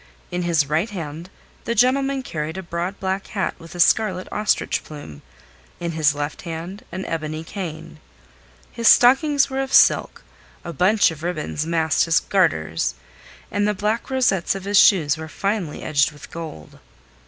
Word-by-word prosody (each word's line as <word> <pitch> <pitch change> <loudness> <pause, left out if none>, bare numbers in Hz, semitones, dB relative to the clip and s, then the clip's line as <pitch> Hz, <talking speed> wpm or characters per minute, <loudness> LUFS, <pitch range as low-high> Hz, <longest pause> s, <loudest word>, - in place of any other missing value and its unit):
In 180 - -2
his 165 -5 +1
right 160 +9 0
hand 165 -3 -7 0.4
the 235 - -1
gentleman 265 +3 +2
carried 160 -4 -4
a 190 - -5
broad 175 +3 -4
black 190 0 -2
hat 195 -4 -2
with 165 +1 -12
a - - -8
scarlet 185 0 +3
ostrich 210 0 0
plume, 145 - -10 0.6
in 170 -1 -3
his 155 -2 +2
left 145 +1 -4
hand 170 +3 -7
an 185 +2 -5
ebony 155 -1 -4
cane. 165 -4 -7 0.7
His 230 -1 -1
stockings 275 +3 +5
were 265 0 -1
of 270 0 -4
silk, - - +4 0.4
a 170 - -6
bunch 190 +5 +3
of 155 -1 -10
ribbons 160 -2 -3
masked 160 -2 +2
his 165 -1 +3
garters, 80 - 0 0.6
and 205 0 +1
the 210 - 0
black 210 +6 -2
rosettes 245 -10 +1
on 195 - -6
his 200 0 +3
shoes 165 -8 +5
were 160 0 -7
finely 195 -3 -3
edged 145 -1 +2
with 150 -1 -14
gold. 160 - -9
175 Hz, 165 wpm, -22 LUFS, 155-205 Hz, 0.7 s, stockings